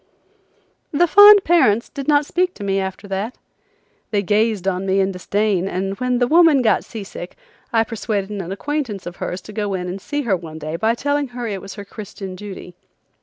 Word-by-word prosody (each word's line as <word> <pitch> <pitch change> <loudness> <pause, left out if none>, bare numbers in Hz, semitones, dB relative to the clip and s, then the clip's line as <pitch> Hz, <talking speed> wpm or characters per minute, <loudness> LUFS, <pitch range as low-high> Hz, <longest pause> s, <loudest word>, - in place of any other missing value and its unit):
The 330 +4 +3
fond 410 +3 +8
parents 240 -10 +3
did 275 -1 -7
not 295 -1 +4
speak 360 +4 0
to 205 - -8
me 195 -1 0
after 190 +1 -5
that. 200 +5 -3 0.7
They 205 -2 0
gazed 210 -1 +1
on 190 0 -1
me 190 +1 +2
in 195 0 +2
disdain 195 0 0
and 195 +1 -2
when 250 -1 +1
the 245 - +3
woman 320 -3 +5
got 215 -4 +2
sea 220 -3 -7
sick 180 -2 -9 0.4
I 225 -1 +3
persuaded 210 -3 -3
an 190 -3 -5
acquaintance 240 -2 -3
of 175 0 -7
hers 180 - -4
to 215 - -11
go 205 -2 -2
in 180 -1 -4
and 185 +2 -5
see 290 +6 -3
her 215 -6 +1
one 165 -3 -8
day 155 +1 -5
by 220 +7 +1
telling 285 +2 -1
her 245 -1 -6
it 200 -4 -4
was 195 0 -9
her 205 -1 -8
Christian 200 -2 -8
duty. 190 -2 -9
205 Hz, 205 wpm, -20 LUFS, 190-250 Hz, 0.7 s, fond